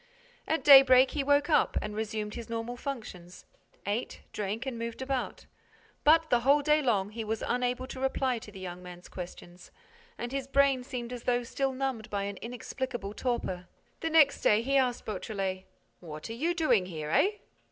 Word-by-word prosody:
At 320 Hz, -, 0 dB
daybreak, 265 Hz, -2 st, +8 dB
he 290 Hz, -, -1 dB
woke 285 Hz, +1 st, +3 dB
up 305 Hz, -, +3 dB
and 210 Hz, -, -5 dB
resumed 215 Hz, -1 st, -3 dB
his 235 Hz, -1 st, -7 dB
normal 230 Hz, +1 st, -4 dB
functions: 215 Hz, -10 st, -7 dB, 0.4 s
ate, 205 Hz, +5 st, -3 dB
drank 210 Hz, +4 st, -3 dB
and 255 Hz, -4 st, -4 dB
moved 230 Hz, 0 st, -5 dB
about. 260 Hz, -1 st, -3 dB, 0.6 s
But, 320 Hz, +1 st, +5 dB
the 245 Hz, -, +5 dB
whole 280 Hz, +4 st, +4 dB
day 300 Hz, +1 st, +4 dB
long, 210 Hz, -7 st, +1 dB
he 225 Hz, +1 st, -5 dB
was 220 Hz, 0 st, -3 dB
unable 250 Hz, +1 st, -1 dB
to 260 Hz, -, -8 dB
reply 265 Hz, -2 st, 0 dB
to 215 Hz, -, -12 dB
the 195 Hz, -, -11 dB
young 180 Hz, -1 st, -7 dB
man's 180 Hz, 0 st, -11 dB
questions 180 Hz, 0 st, -10 dB, 0.5 s
and 240 Hz, -, -5 dB
his 270 Hz, -1 st, -3 dB
brain 275 Hz, -2 st, +3 dB
seemed 250 Hz, -2 st, -5 dB
as 245 Hz, -, -8 dB
though 245 Hz, 0 st, +1 dB
still 270 Hz, +3 st, -1 dB
numbed 260 Hz, -4 st, -3 dB
by 200 Hz, -1 st, -2 dB
an 200 Hz, 0 st, -4 dB
inexplicable 240 Hz, -2 st, -5 dB
torpor. 215 Hz, -8 st, -3 dB, 0.3 s
The 325 Hz, -, -2 dB
next 310 Hz, -3 st, +5 dB
day, 215 Hz, +2 st, +4 dB
he 275 Hz, +3 st, 0 dB
asked 255 Hz, -3 st, +1 dB
Beautrelet: 195 Hz, -2 st, -3 dB, 0.3 s
"What 155 Hz, +3 st, -8 dB
are -, -, -3 dB
you 325 Hz, +9 st, -1 dB
doing 245 Hz, -, +2 dB
here, 155 Hz, -4 st, -5 dB
eh?" 400 Hz, -, +3 dB
240 Hz, 185 wpm, -29 LUFS, 205-270 Hz, 0.6 s, daybreak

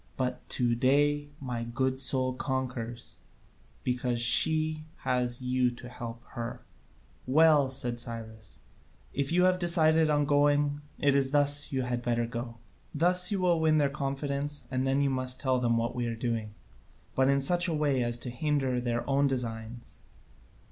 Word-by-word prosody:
But 125 Hz, -1 st, -3 dB
to 120 Hz, -2 st, +1 dB
day 145 Hz, +4 st, +1 dB
my 125 Hz, -4 st, -4 dB
good 130 Hz, +3 st, -2 dB
soul 130 Hz, -1 st, +2 dB
conquers, 125 Hz, -3 st, -5 dB, 0.7 s
because 125 Hz, -1 st, -1 dB
she 155 Hz, +5 st, +3 dB, 0.2 s
has 125 Hz, 0 st, -1 dB
you 125 Hz, 0 st, +1 dB
to 125 Hz, -, -11 dB
help 120 Hz, -1 st, -8 dB
her." 115 Hz, -2 st, -6 dB, 0.7 s
"Well," 150 Hz, 0 st, +4 dB
said 125 Hz, -2 st, -2 dB
Cyrus, 110 Hz, -3 st, -7 dB, 0.5 s
"if 140 Hz, +1 st, -2 dB
you 180 Hz, +1 st, +3 dB
have 185 Hz, 0 st, +3 dB
decided 160 Hz, -2 st, +4 dB
on 145 Hz, -1 st, +2 dB
going, 145 Hz, 0 st, +2 dB, 0.2 s
it 140 Hz, -1 st, +2 dB
is 135 Hz, -1 st, +2 dB
thus 145 Hz, 0 st, +3 dB
you 130 Hz, -2 st, -1 dB
had 125 Hz, -1 st, -3 dB
better 120 Hz, -1 st, -1 dB
go. 115 Hz, 0 st, -6 dB, 0.4 s
Thus 180 Hz, +4 st, +4 dB
you 200 Hz, -, 0 dB
will 175 Hz, -3 st, +2 dB
win 155 Hz, -1 st, +3 dB
their 145 Hz, -2 st, +2 dB
confidence, 140 Hz, +1 st, -3 dB
and 130 Hz, +1 st, -1 dB
then 135 Hz, +1 st, +1 dB
you 140 Hz, -, +1 dB
must 130 Hz, -1 st, -1 dB
tell 130 Hz, -2 st, +1 dB
them 120 Hz, -1 st, +1 dB
what 115 Hz, +1 st, -1 dB
we 120 Hz, -1 st, -3 dB
are 115 Hz, -, -3 dB
doing, 115 Hz, -2 st, -4 dB, 0.6 s
but 130 Hz, 0 st, +2 dB
in 140 Hz, 0 st, +3 dB
such 175 Hz, +6 st, +2 dB
a 170 Hz, -, -1 dB
way 145 Hz, -4 st, +1 dB
as 120 Hz, 0 st, 0 dB
to 125 Hz, -, -5 dB
hinder 135 Hz, -1 st, -1 dB
their 120 Hz, -1 st, -2 dB
own 140 Hz, 0 st, +2 dB
designs. 120 Hz, -2 st, -5 dB
130 Hz, 165 wpm, -29 LUFS, 120-145 Hz, 0.7 s, Well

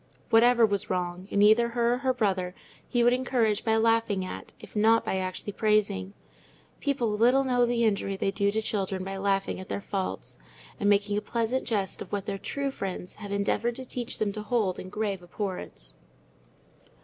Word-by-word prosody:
Whatever 235 Hz, +1 st, +6 dB
was 200 Hz, -2 st, -1 dB
wrong, 180 Hz, 0 st, -2 dB
in 200 Hz, -, +3 dB
either 225 Hz, +3 st, +5 dB
her 235 Hz, 0 st, +1 dB
or -, -, 0 dB
her 260 Hz, -1 st, +1 dB
brother, 190 Hz, -7 st, -1 dB, 0.3 s
he 240 Hz, -1 st, +2 dB
would 240 Hz, +1 st, +5 dB
encourage 245 Hz, -5 st, +1 dB
by 220 Hz, -1 st, +2 dB
laughing 225 Hz, -4 st, +2 dB
at, -, -, -7 dB
if 215 Hz, -3 st, -13 dB
not 225 Hz, +2 st, +4 dB
by 190 Hz, -, 0 dB
actually 185 Hz, +2 st, -4 dB
praising: 205 Hz, -, +1 dB, 0.7 s
people 270 Hz, -6 st, 0 dB
little 245 Hz, +6 st, +4 dB
know 245 Hz, -2 st, +2 dB
the 235 Hz, -1 st, +1 dB
injury 200 Hz, -2 st, 0 dB
they 195 Hz, -, 0 dB
do 200 Hz, 0 st, +1 dB
to 220 Hz, +2 st, -1 dB
children 195 Hz, -3 st, -2 dB
by 195 Hz, +1 st, -5 dB
laughing 195 Hz, -1 st, 0 dB
at 185 Hz, -, -9 dB
their -, -, -2 dB
faults, 195 Hz, -1 st, -4 dB, 0.4 s
and 205 Hz, -2 st, +2 dB
making 205 Hz, 0 st, +2 dB
a -, -, -10 dB
pleasant 235 Hz, +4 st, -1 dB
jest 200 Hz, -5 st, -1 dB
of -, -, -8 dB
what 200 Hz, -1 st, -2 dB
their 195 Hz, -1 st, -3 dB
true 280 Hz, +6 st, -3 dB
friends 190 Hz, -6 st, -5 dB
have 205 Hz, -1 st, -6 dB
endeavoured 200 Hz, +4 st, 0 dB
to 260 Hz, -, -7 dB
teach 245 Hz, -1 st, -4 dB
them 205 Hz, -2 st, -1 dB
to 215 Hz, -, -5 dB
hold 210 Hz, -4 st, 0 dB
in 185 Hz, -, -7 dB
grave 205 Hz, -2 st, -2 dB
abhorrence. 180 Hz, -, -6 dB
210 Hz, 190 wpm, -28 LUFS, 195-235 Hz, 0.7 s, Whatever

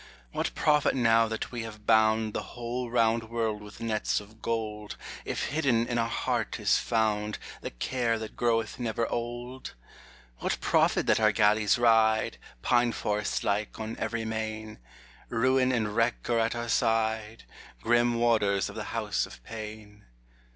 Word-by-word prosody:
What -, -, -2 dB
profit 150 Hz, -2 st, +3 dB
now 115 Hz, -2 st, +4 dB
that 110 Hz, 0 st, -4 dB
we 120 Hz, -2 st, -4 dB
have 110 Hz, -2 st, -9 dB
bound 110 Hz, -1 st, +3 dB
The -, -, -2 dB, 0.2 s
whole 120 Hz, +1 st, -3 dB
round 115 Hz, -1 st, +2 dB
world 110 Hz, -2 st, -1 dB
with 105 Hz, 0 st, -12 dB
nets 110 Hz, -2 st, 0 dB
of 110 Hz, +2 st, -15 dB
gold, 105 Hz, -2 st, -3 dB, 0.3 s
If -, -, -2 dB
hidden 135 Hz, -6 st, +2 dB
in 120 Hz, 0 st, -1 dB
our 115 Hz, 0 st, 0 dB
heart -, -, -1 dB
is -, -, +3 dB
found 105 Hz, -2 st, 0 dB, 0.2 s
The -, -, -4 dB
care 115 Hz, -, -1 dB
that 110 Hz, -1 st, -7 dB
groweth 115 Hz, -1 st, 0 dB
never 115 Hz, -1 st, -1 dB
old? 120 Hz, -, -5 dB, 0.6 s
What -, -, -1 dB
profit -, -, +2 dB
that -, -, +3 dB
our 110 Hz, -1 st, +5 dB
galleys 105 Hz, 0 st, +3 dB
ride, 110 Hz, -2 st, +3 dB, 0.2 s
Pine 120 Hz, -1 st, +3 dB
forest 105 Hz, 0 st, -1 dB
like, 105 Hz, +2 st, -1 dB
on 110 Hz, +1 st, -4 dB
every 115 Hz, 0 st, -2 dB
main? 110 Hz, -, -4 dB, 0.5 s
Ruin 130 Hz, +2 st, +2 dB
and 110 Hz, -4 st, -1 dB
wreck 115 Hz, +1 st, +1 dB
are 115 Hz, -, +3 dB
at 115 Hz, +1 st, +1 dB
our 120 Hz, 0 st, -3 dB
side, 110 Hz, -2 st, 0 dB, 0.4 s
Grim 120 Hz, 0 st, +3 dB
warders 110 Hz, -5 st, +2 dB
of -, -, -10 dB
the -, -, -4 dB
House -, -, 0 dB
of -, -, -14 dB
pain. 105 Hz, -, -9 dB
115 Hz, 160 wpm, -28 LUFS, 110-120 Hz, 0.6 s, our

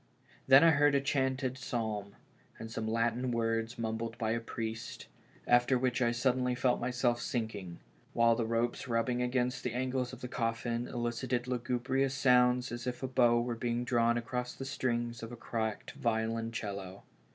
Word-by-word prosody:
Then 135 Hz, +2 st, +8 dB
I 165 Hz, -, +7 dB
heard 145 Hz, -1 st, +4 dB
a -, -, +5 dB
chanted 130 Hz, -1 st, -1 dB
psalm, 110 Hz, -5 st, -3 dB, 0.4 s
and 110 Hz, 0 st, -8 dB
some 110 Hz, -1 st, -3 dB
Latin 115 Hz, +3 st, 0 dB
words 115 Hz, 0 st, -1 dB
mumbled 115 Hz, 0 st, -3 dB
by 110 Hz, -2 st, -1 dB
a 115 Hz, -, 0 dB
priest, 115 Hz, -1 st, -5 dB, 0.4 s
after 120 Hz, +2 st, +4 dB
which 125 Hz, 0 st, 0 dB
I 120 Hz, -1 st, +3 dB
suddenly 125 Hz, +1 st, +1 dB
felt 125 Hz, 0 st, +1 dB
myself 120 Hz, -1 st, 0 dB
sinking, 110 Hz, -, -3 dB, 0.4 s
while 115 Hz, 0 st, +5 dB
the 115 Hz, -1 st, -1 dB
ropes 115 Hz, +3 st, -1 dB
rubbing 120 Hz, +1 st, 0 dB
against 125 Hz, 0 st, 0 dB
the 125 Hz, -, -2 dB
angles 130 Hz, 0 st, -1 dB
of 130 Hz, -, -10 dB
the 125 Hz, -, -4 dB
coffin 115 Hz, 0 st, -2 dB
elicited 120 Hz, +1 st, -2 dB
lugubrious 125 Hz, +2 st, 0 dB
sounds 125 Hz, -2 st, +4 dB
as 120 Hz, +1 st, -5 dB
if 125 Hz, +1 st, -4 dB
a -, -, 0 dB
bow 120 Hz, -2 st, +4 dB
were 120 Hz, 0 st, -2 dB
being 120 Hz, +1 st, -1 dB
drawn 120 Hz, -1 st, +2 dB
across 125 Hz, +1 st, -3 dB
the 135 Hz, -, -6 dB
strings 120 Hz, -3 st, -2 dB
of 115 Hz, +1 st, -7 dB
a -, -, -6 dB
cracked 110 Hz, -2 st, -3 dB
violon 115 Hz, 0 st, -1 dB
cello. 100 Hz, -4 st, -5 dB
120 Hz, 170 wpm, -32 LUFS, 115-125 Hz, 0.4 s, Then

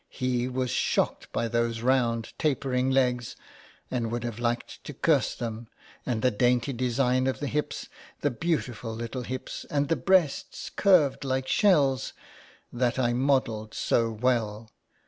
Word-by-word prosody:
He 125 Hz, -1 st, -1 dB
was 130 Hz, -1 st, -2 dB
shocked -, -, 0 dB
by 115 Hz, -, -1 dB
those 115 Hz, -1 st, 0 dB
round 120 Hz, -3 st, +1 dB
tapering 130 Hz, -3 st, +1 dB
legs; 125 Hz, -3 st, +1 dB, 0.6 s
and 120 Hz, -3 st, -1 dB
would 120 Hz, 0 st, -2 dB
have 120 Hz, -1 st, -4 dB
liked 120 Hz, 0 st, -2 dB
to -, -, -7 dB
curse -, -, +2 dB
them; 115 Hz, -1 st, -5 dB, 0.4 s
and 120 Hz, -4 st, -1 dB
the 125 Hz, -, +4 dB
dainty 125 Hz, +4 st, +2 dB
design 125 Hz, +1 st, +1 dB
of 130 Hz, -, -1 dB
the 145 Hz, -, -3 dB
hips, 150 Hz, +2 st, -2 dB, 0.3 s
the 145 Hz, -, +1 dB
beautiful 125 Hz, -6 st, -2 dB
little 115 Hz, +3 st, -4 dB
hips, 130 Hz, +1 st, -5 dB
and 145 Hz, -1 st, 0 dB
the 165 Hz, -, +3 dB
breasts 185 Hz, -7 st, +1 dB
curved 170 Hz, -10 st, +3 dB
like 130 Hz, -1 st, -1 dB
shells, 140 Hz, -, +3 dB, 0.6 s
that 120 Hz, 0 st, 0 dB
I 120 Hz, -2 st, +2 dB
modelled 120 Hz, -5 st, 0 dB
so 115 Hz, -1 st, +1 dB
well. 110 Hz, -1 st, -1 dB
125 Hz, 145 wpm, -27 LUFS, 115-135 Hz, 0.6 s, the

